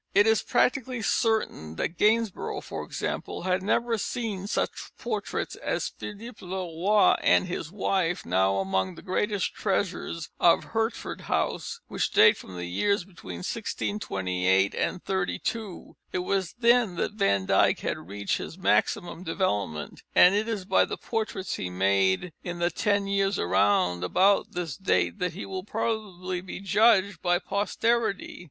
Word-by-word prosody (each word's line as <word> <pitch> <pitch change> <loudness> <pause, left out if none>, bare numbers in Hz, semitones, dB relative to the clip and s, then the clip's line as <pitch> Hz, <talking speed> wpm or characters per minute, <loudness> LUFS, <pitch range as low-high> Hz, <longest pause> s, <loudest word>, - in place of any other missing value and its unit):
It 205 - +6
is 220 -1 +4
practically 255 -2 0
certain 205 - 0
that - - -1
Gainsborough, 215 +1 +1
for - - -6
example, - - -4
had 185 +1 +1
never 230 +3 +1
seen 200 -3 -3
such - - -2
portraits 215 -4 -3
as - - -2
the - - -5
Philippe 230 +1 -11
le 185 +1 -5
Roy 185 +4 +3
and - - +4
his 175 -3 -5
wife, 185 -3 0
now 95 +2 +2
among 95 -1 -1
the - - -12
greatest 205 +1 -1
treasures 185 -5 -2
of 170 - +5
Hertford 225 0 -3
House, - - -1
which - - -1
date - - +6
from 95 - -11
the 90 - -4
years 200 - +1
between 95 - -9
1628 95 - 0 0.3
32. 195 +2 -3 0.2
It - - -2
was 180 0 -1
then 235 -5 +3
that 200 - -2
Van 150 - +1
Dyck - - +3
had - - -2
reached 100 +3 -3
his 165 - -7
maximum 185 -1 +1
development, 105 - -2
and 180 - +8
it 210 +2 +1
is 210 -5 -3
by - - +4
the - - -4
portraits 210 -5 -3
he 90 - -3
made 95 - +1
in 175 -1 -4
the 175 0 +1
ten 200 +3 +1
years 195 -1 +1
round 90 -1 +2
about 195 - +3
this 170 -6 -3
date 195 +1 +1
that 180 -1 -1
he 190 - -6
will 190 -1 -5
probably 200 -5 -3
be 185 -1 -7
judged 200 0 +3
by 175 -1 +3
posterity. 220 +3 -1
190 Hz, 150 wpm, -27 LUFS, 160-210 Hz, 0.3 s, and